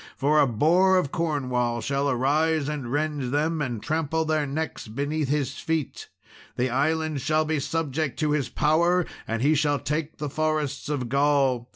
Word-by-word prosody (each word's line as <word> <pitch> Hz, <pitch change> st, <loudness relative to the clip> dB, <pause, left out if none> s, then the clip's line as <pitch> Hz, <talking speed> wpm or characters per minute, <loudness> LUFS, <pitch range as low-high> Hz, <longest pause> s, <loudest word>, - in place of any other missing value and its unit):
For 150 Hz, +2 st, +3 dB
a 140 Hz, -, +5 dB
Boar 175 Hz, -, +3 dB
of 145 Hz, -7 st, 0 dB
Cornwall 125 Hz, -8 st, -1 dB
shall 140 Hz, +3 st, -1 dB
arise 145 Hz, +4 st, +1 dB
and 145 Hz, -5 st, -4 dB
rend 145 Hz, -3 st, -1 dB
them, 155 Hz, +2 st, 0 dB
and 120 Hz, -6 st, -3 dB
trample 160 Hz, 0 st, -1 dB
their 155 Hz, -2 st, 0 dB
necks 155 Hz, -2 st, -4 dB
beneath 145 Hz, +5 st, -2 dB
his 140 Hz, -2 st, -1 dB
feet. 160 Hz, -4 st, -3 dB, 0.5 s
The 125 Hz, 0 st, 0 dB
island 155 Hz, +2 st, 0 dB
shall 155 Hz, +2 st, +1 dB
be 155 Hz, -1 st, 0 dB
subject 155 Hz, -2 st, -2 dB
to 155 Hz, -1 st, +1 dB
his 150 Hz, -3 st, 0 dB
power, 170 Hz, +4 st, +2 dB, 0.2 s
and 115 Hz, +1 st, -2 dB
he 150 Hz, +3 st, +4 dB
shall 145 Hz, -1 st, +2 dB
take 150 Hz, +2 st, -3 dB
the 150 Hz, -, -3 dB
forests 155 Hz, -2 st, -2 dB
of 135 Hz, -5 st, -2 dB
Gaul. 135 Hz, -2 st, +2 dB
150 Hz, 170 wpm, -25 LUFS, 135-155 Hz, 0.5 s, a